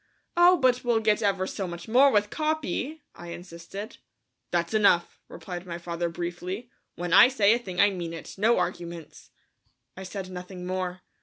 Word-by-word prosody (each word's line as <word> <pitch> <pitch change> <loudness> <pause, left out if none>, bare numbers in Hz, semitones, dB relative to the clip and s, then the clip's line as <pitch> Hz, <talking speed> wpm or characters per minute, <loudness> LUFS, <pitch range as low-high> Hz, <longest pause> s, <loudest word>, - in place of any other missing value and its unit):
"Oh, 350 +1 +6
but 255 -4 +2
we'll 240 -2 +2
get 220 0 +2
ever 195 -3 +1
so 190 0 -4
much 170 0 -8
more 260 +5 +6
with 210 -4 +2
Capi," 310 -1 -2
I 175 - -11
insisted. 175 +5 -8 0.5
"That's 170 +1 -1
enough," 200 -5 +3
replied 180 -1 -8
my 170 -1 -4
father 170 0 -3
briefly; 175 +7 -5 0.2
"when 175 0 -3
I 215 - +9
say 220 -5 +4
a 235 - +1
thing 185 -6 -7
I 205 - +6
mean 175 -3 -5
it. 165 - -8
No 220 +4 +3
arguments." 170 -2 -5 0.7
I 190 - -9
said 190 0 -6
nothing 180 0 -8
more. 185 0 -3
185 Hz, 170 wpm, -27 LUFS, 175-225 Hz, 0.7 s, I